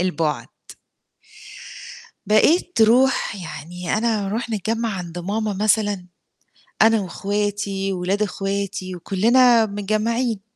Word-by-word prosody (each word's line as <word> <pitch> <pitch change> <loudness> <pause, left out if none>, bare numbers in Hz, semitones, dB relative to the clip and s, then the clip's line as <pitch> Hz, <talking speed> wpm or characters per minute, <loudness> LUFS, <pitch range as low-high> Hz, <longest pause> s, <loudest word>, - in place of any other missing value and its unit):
البُعد. 165 -4 -1 1.8
بقيت 305 - +3
ترُوح 240 +1 +3
يعني 175 0 -5
أنا 220 -3 0
أرُوح 225 +4 -3
نتجمّع 225 +2 -1
عند 175 -1 -7
ماما 210 +4 -2
مثلًا، 205 -2 +1 0.8
أنا 225 0 +5
واخواتي 200 +1 -2
وولاد 190 +3 -1
اخواتي 195 -2 -3
وكُلّنا 230 +6 +4
متجمّعين. 215 +2 -1
205 Hz, 90 wpm, -21 LUFS, 190-225 Hz, 1.8 s, أنا